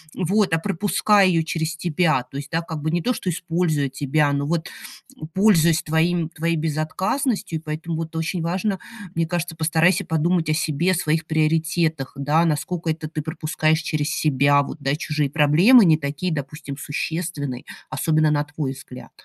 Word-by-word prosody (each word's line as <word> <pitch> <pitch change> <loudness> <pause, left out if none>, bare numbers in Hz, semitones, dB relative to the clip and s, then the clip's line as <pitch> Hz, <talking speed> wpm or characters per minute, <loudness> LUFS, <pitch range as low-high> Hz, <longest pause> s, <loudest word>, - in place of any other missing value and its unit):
вот, 195 +1 +1
а 165 - +3
пропуская 205 +2 +2
её 170 -3 +2
через 160 0 -2
тебя. 165 -5 +1
То 135 - -8
есть, 145 0 -7
да, 165 0 0
как 165 -3 -6
бы 155 - 0
не 175 +1 0
то, 250 - 0
что 185 - -3
используя 165 -4 -1
тебя, 145 +2 +1
но 140 0 -1
вот, 165 +2 -2 0.6
пользуясь 170 -6 +4
твоим 160 0 +2 0.3
твоей 165 +1 0
безотказностью. 165 - -1
И - - -18
поэтому 160 +2 -4
вот 165 0 -5
очень 165 +2 -2
важно, 190 +4 -1 0.4
мне 165 0 +1
кажется, 175 -1 -3
постарайся 165 +4 +2
подумать 160 +1 0
о - - +3
себе, 160 +3 +1
своих 160 -2 0
приоритетах, 160 -2 0
да, 145 +4 +2
наскока 165 +2 -1
это 155 0 -5
ты 155 0 -4
пропускаешь 155 0 0
через 150 -2 -2
себя, 145 -2 +3
вот, - - -7
да, 140 +1 0
чужие 150 -2 -1
проблемы 160 - +6
не 160 -3 +5
такие, 145 +4 -3
допустим, 145 -1 -6
существенные, 145 -3 -4 0.3
особенно 155 +2 +1
на 145 -1 +1
твой 145 -2 -4
взгляд. 130 -1 -11
160 Hz, 170 wpm, -22 LUFS, 150-170 Hz, 0.6 s, проблемы